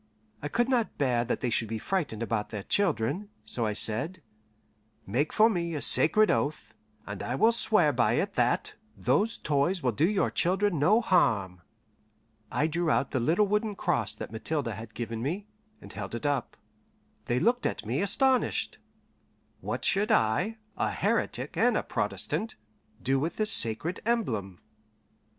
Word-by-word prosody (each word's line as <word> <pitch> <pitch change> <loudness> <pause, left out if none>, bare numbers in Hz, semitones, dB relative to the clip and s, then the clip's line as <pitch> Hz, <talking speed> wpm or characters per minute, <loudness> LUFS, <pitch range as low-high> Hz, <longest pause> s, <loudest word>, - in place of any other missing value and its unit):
I 145 - -3
could 235 +10 0
not 245 -4 0
bear 125 -4 +1
that - - -2
they 125 - -1
should 115 0 +1
be 110 +1 -3
frightened 145 - -2
about 110 -2 -2
their 105 -2 -6
children, 180 - 0 0.2
so 115 +1 -1
I 105 - -1
said: 110 - -1 0.8
"Make 130 +10 -1
for 220 - +5
me 170 -6 -2
a - - -2
sacred 215 +7 +4
oath, 150 +2 -2 0.3
and 100 -1 -6
I 125 - -3
will 220 +12 +4
swear 235 - +5
by - - +2
it - - -1
that - - 0 0.2
those 225 +3 +1
toys 150 +5 0
will 125 - +2
do 155 - +1
your 205 -2 +1
children 185 -1 +1
no 210 +11 +4
harm." 100 - +1 0.9
I 150 - +1
drew 165 +1 -1
out 135 -2 +1
the 130 - 0
little 165 - +2
wooden 210 +1 -1
cross 115 - 0
that - - -8
Mathilde 135 +4 -3
had 110 +1 -8
given 115 -1 -4
me, 175 - -3 0.4
and - - -12
held 105 0 -6
it 120 - -6
up. 140 -4 -1 0.7
They 120 +1 0
looked 245 - +2
at - - -5
me - - -1
astonished. 260 +6 +1 0.8
What - - -4
should 205 +3 +2
I, 185 - +1 0.2
a - - 0
heretic - - -1
and - - +3
a - - -1
Protestant, 225 - -3 0.5
do 135 +2 +1
with 160 +5 -2
this 215 0 +1
sacred 115 +11 0
emblem? 155 - -2
150 Hz, 165 wpm, -28 LUFS, -, 0.9 s, for